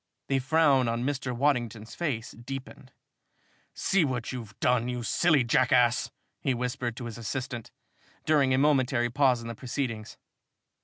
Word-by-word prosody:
The 135 -1 +2
frown 140 -2 +3
on 115 +1 -1
Mr. 135 -1 -2
Waddington's 120 -4 -1
face 135 -10 -3
deepened. 130 +2 -9 0.8
"See 195 -3 +2
what 125 -5 -2
you've 115 -5 -8
done, 125 -1 +2
you 125 -1 -3
silly 150 +3 +3
jackass!" 125 0 +3 0.3
he 130 - 0
whispered 120 -1 -3
to 125 - -6
his 115 -1 -7
assistant, 120 0 -4 0.6
during 145 -4 +3
a 130 - +3
momentary 130 -4 +2
pause 130 -3 +3
in - - -7
the 115 - -4
proceedings. 115 -3 -4
125 Hz, 145 wpm, -28 LUFS, 120-135 Hz, 0.8 s, frown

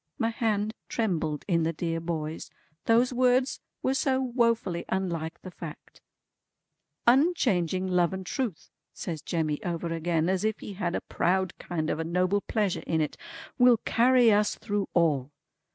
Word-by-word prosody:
'" - - -57
My 225 0 0
hand 215 -2 0 0.2
trembled 170 -9 -1
in 170 -4 +2
the 165 +1 0
dear 165 0 -2
boy's, 160 -2 -4 0.4
those 240 +3 +3
words 255 +1 +2 0.2
were 260 - +2
so 265 -1 +1
wofully 230 -8 +1
unlike 170 -4 -2
the 185 - -8
fact. 165 -3 -10 1.0
"Unchanging 240 - +3
Love 180 -2 +2
and 190 0 -5
Truth" 225 - -4 0.2
says 160 -4 -5
Jemmy 155 -3 -2
over 170 -1 -2
again, 165 0 0
as 190 +1 0
if 220 0 0
he 205 - -7
had 180 -3 -2
a - - -1
proud 185 0 0
kind 160 -3 -2
of - - -2
a - - 0
noble 180 +4 +1
pleasure 205 -4 -1
in 160 - +1
it, 150 -2 -1 0.4
"will 245 -1 +7
carry 245 +1 +4
us 210 0 +2
through 205 -2 -2
all! 150 -6 +2
185 Hz, 160 wpm, -28 LUFS, 165-230 Hz, 1.0 s, will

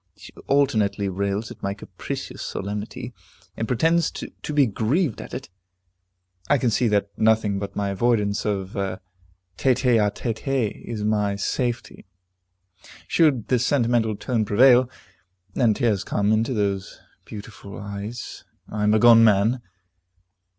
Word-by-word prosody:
She - - -13
alternately 110 -8 +2
rails 100 +3 -2
at - - -12
my 100 0 -2
capricious - - -7
solemnity, 105 +2 -5 0.4
and 115 - -3
pretends 165 +7 +2
to - - -7 0.2
be 145 -2 +4
grieved 125 - 0
at - - -10
it. - - -6 1.0
I 145 - +5
can 125 -3 +1
see 120 +2 +2
that 100 -2 +1
nothing 110 -2 +2
but 100 0 -6
my 100 -1 -1
avoidance 105 0 +1
of 100 -2 -3
a 95 -1 -2 0.6
tete 130 0 +1
a 115 -4 +4
tete 110 +4 -5 0.4
is 110 -3 -5
my 105 -1 +1
safety. 120 +1 -3 1.0
Should 145 -9 +2
the 125 - +3
sentimental 120 -4 +1
tone 115 +2 -1
prevail, 125 +4 +5 0.6
and 115 -5 +2
tears 105 -6 +1
come 105 +1 0
into 115 +4 +1
those 100 -2 -2 0.3
beautiful 100 -1 -10
eyes, 105 +3 -7 0.2
I 105 - -5
am 105 +1 +3
a - - +4
gone 115 -1 +7
man. 110 +3 +3
110 Hz, 135 wpm, -23 LUFS, 100-120 Hz, 1.0 s, gone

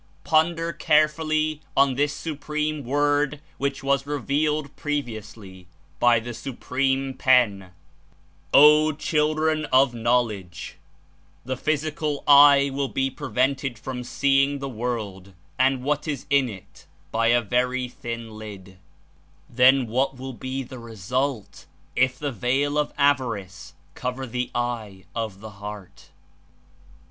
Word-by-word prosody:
Ponder 165 - +1
carefully 155 0 +1 0.2
on 135 -1 +4
this 145 +3 +1
Supreme 150 -1 -3
Word 145 +2 +1 0.2
which 140 0 -2
was 140 0 +1
revealed 145 0 -1
previous 120 -8 -4
ly 95 -4 -13 0.3
by 120 -1 +5
the 120 +2 -7
Supreme 135 +2 -2
Pen, 115 -9 +2 0.8
'O 150 +1 +7
children 155 +1 0
of 130 -2 +3
knowledge: 115 -6 -1 0.7
the 130 +1 -2
physical 155 +1 -2
eye 140 -1 +7
will 140 0 -1
be 135 0 -1
prevented 135 -2 -1
from 125 +1 -6
seeing 140 +2 +2
the 140 0 -5
world 110 -6 -5 0.3
and 130 0 +2
what 150 +3 -1
Is 145 -4 -3
in 140 -3 +3
It 95 -4 -13 0.2
by 115 0 +1
a 120 +1 +5
very 125 +2 0
thin 115 -3 -7
lid; 95 -3 -10 0.7
then 130 +2 +4
what 130 +4 -1
will 130 +1 -7
be 130 +3 -5
the 130 0 -10
result 115 +2 -4 0.3
If 130 0 +2
the 145 0 -3
veil 135 +5 0
of 150 - -1
avarice 115 - -1 0.2
cover 125 - -4
the 125 0 -3
eye 115 -6 -3
of 110 -4 -4
the 110 0 -9
heart'." 105 -3 -9
130 Hz, 125 wpm, -24 LUFS, 115-145 Hz, 0.8 s, O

